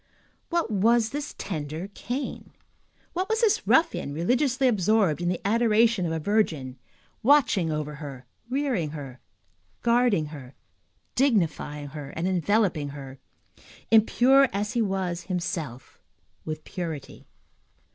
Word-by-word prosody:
What 340 -8 0
was 220 +3 +3
this 290 +1 -5
tender 155 0 -4
Cain? 255 +7 -5 0.6
What 370 +3 -2
was 445 +1 +1
this 450 -3 +2
ruffian 320 - +2
religiously 255 - +2
absorbed 205 -6 +2
in 175 - 0
the 180 - -1
adoration 225 -2 +3
of - - -2
a 160 - -1
virgin, 155 - 0 0.4
watching 230 - +4
over 150 -1 -3
her, 135 -4 -8 0.2
rearing 255 - 0
her, 130 -3 -8 0.6
guarding 235 -8 +3
her, 135 -3 -10 0.6
dignifying 165 - 0
her, 145 -1 -7
and 165 +3 -1
enveloping 185 -4 +1
her, 135 -2 -9 0.7
impure 255 +5 +5
as 205 +3 -2
he 240 - +1
was 190 -4 -2
himself, 165 - -4 0.5
with 155 0 -5
purity? 165 -6 -6
190 Hz, 120 wpm, -26 LUFS, 155-240 Hz, 0.7 s, impure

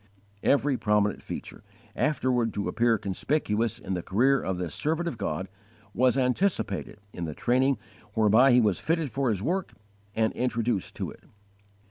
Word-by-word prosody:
Every 140 -1 +2
prominent 105 -2 +1
feature, - - -8 0.3
afterward 125 -6 +1
to 100 - -2
appear 115 0 +2
conspicuous 105 +2 -1
in 95 - -5
the 90 - -2
career 130 +10 +2
of 95 -1 -2
this 90 -4 -4
servant 160 +3 -1
of 160 - -2
God, 95 -4 -3 0.5
was 130 +1 +3
anticipated 125 - 0 0.2
in 85 - -4
the 75 -2 -5
training 130 +2 +2 0.4
whereby 110 +4 +5
he 125 0 +6
was 105 -6 +1
fitted 160 -4 -1
for 135 -2 0
his 100 -3 -1
work 185 +6 -1 0.4
and 110 0 +1
introduced 120 -5 -1
to - - -4
it. - - -15
120 Hz, 155 wpm, -27 LUFS, 105-135 Hz, 0.5 s, he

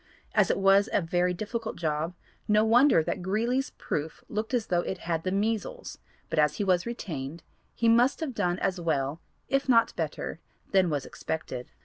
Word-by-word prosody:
As - - +4
it - - +2
was 195 +1 +4
a - - +3
very 175 +1 +1
difficult 220 +5 -4
job 160 +1 -2 0.3
no 215 +1 +4
wonder 240 - +5
that 180 - -3
Greeley's 230 +8 0
proof 150 +1 -4
looked 215 +1 -3
as 240 -4 +1
though 175 -4 +1
it 190 - -4
had 165 -1 0
the 185 - -1
measles, 220 - -2 0.3
but - - -1
as 150 -1 +3
he - - -1
was 185 0 +2
retained 165 - -5 0.3
he 230 - +1
must 240 +4 +4
have 310 -6 -3
done 175 -5 0
as 185 -1 -1
well 150 -1 -1 0.3
if 275 0 0
not 230 -2 +4
better - - -4 0.3
than 190 -3 +4
was 145 -4 -2
expected. 130 -6 -5
190 Hz, 180 wpm, -28 LUFS, 165-230 Hz, 0.3 s, wonder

